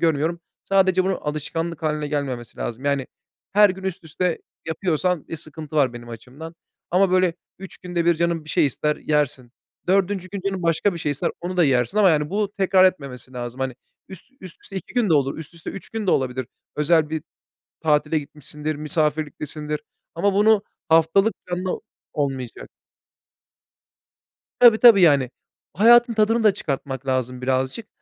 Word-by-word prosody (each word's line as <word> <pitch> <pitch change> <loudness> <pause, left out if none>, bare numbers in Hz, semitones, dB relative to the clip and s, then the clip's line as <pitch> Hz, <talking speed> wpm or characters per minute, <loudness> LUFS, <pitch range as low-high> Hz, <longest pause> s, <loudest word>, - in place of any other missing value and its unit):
görmüyorum. 165 +1 +1 0.2
Sadece 190 -1 +3
bunun 190 0 +1
alışkanlık 165 +2 -4
hâline 150 -1 -1
gelmemesi 135 -5 -4
lazım. 120 +4 -5
Yani, 140 -2 0 0.5
her 205 0 +6
gün 190 +1 -7
üst 185 -2 -4
üste 165 +2 -1 0.3
yapıyorsan 165 0 -1
bir 165 - -5
sıkıntı 155 -1 -7
var, 135 -4 +3
benim 120 0 -10
açımdan. 130 +8 -10 0.4
Ama, 185 +2 +3
böyle, 185 -2 +3 0.2
3 195 0 -10
günde 175 -2 -2
1 170 0 +4
canın 170 -1 -1
bir - - -14
şey - - +3
ister, 150 +3 -1
yersin. 135 -5 -1 0.3
4. 190 0 +1
gün, 200 -2 -5
canın 190 -1 -3
başka 165 +4 +2
bir - - -5
şey 150 -3 -1
ister, 140 - -1
onu 180 +1 -4
da 175 - +5
yersin 130 - +1
ama 200 -3 +6
yani 150 -1 +1
bu, 205 +1 -1
tekrar 190 -1 +4
etmemesi 135 -8 -1
lazım. 120 0 -6
Hani, 130 -2 -2 0.3
üst 190 -3 -11 0.2
üst 185 -3 -10
üste 195 - -10
2 190 - -7
gün 240 -4 +2
de 165 - +3
olur 140 -1 +1
üst 160 +1 -9
üste 165 - -7
3 195 - -9
gün 220 -3 -4
de - - +3
olabilir. 130 -2 0 0.3
Özel 155 0 +2
bir 160 -1 -3 0.6
tatile 150 0 +2
gitmişsindir, 150 +1 -6
misafirliktesindir. 150 0 -2 0.3
Ama 200 +4 +1
bunu, 210 +1 +4 0.3
haftalık, 165 +7 +4
planlı 180 +1 -2 0.3
olmayacak. 135 -5 -4 1.9
Tabii, 235 -3 +8
tabii, 230 -5 +8
yani. 140 -7 +4 0.4
Hayatın 235 +6 +6
tadını 220 +1 +2
da 210 - +5
çıkartmak 135 -3 -4
lazım 130 -1 -1
birazcık. 130 - -1
160 Hz, 165 wpm, -22 LUFS, 145-185 Hz, 1.9 s, Tabii